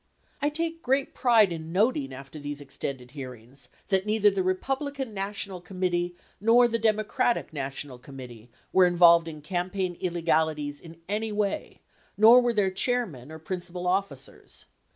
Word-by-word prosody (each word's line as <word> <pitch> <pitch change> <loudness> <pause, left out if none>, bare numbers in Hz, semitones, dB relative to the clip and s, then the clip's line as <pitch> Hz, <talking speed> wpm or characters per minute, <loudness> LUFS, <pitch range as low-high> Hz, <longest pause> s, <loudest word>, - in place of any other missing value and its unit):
I 290 - +2
take 330 +2 -3
great 270 0 0
pride 225 -6 +4
in 160 -1 -6
noting 185 - +1
after 135 +3 -9
these 145 0 -6
extended 135 -2 -6
hearings 130 -1 -10 0.2
that 190 0 +1
neither 210 -1 +4
the 195 -1 -1
Republican 265 +7 -2
National 195 -2 -3
Committee 175 -1 -2 0.2
nor 235 +3 +5
the 230 0 -1
Democratic 220 0 +1
National 135 -2 -5
Committee 125 -3 -11 0.2
were 185 -1 +6
involved 170 -1 +6
in 155 -2 -8
campaign 180 +2 -2
illegalities 160 -4 0
in 165 -1 -13
any 215 +2 -2
way, 205 -1 -2 0.4
nor 230 +4 +8
were 240 -1 +2
their 200 -3 +2
chairmen 185 - -1
or 160 - -7
principal 180 +2 -5
officers. 180 -8 -3
180 Hz, 145 wpm, -27 LUFS, 150-215 Hz, 0.4 s, nor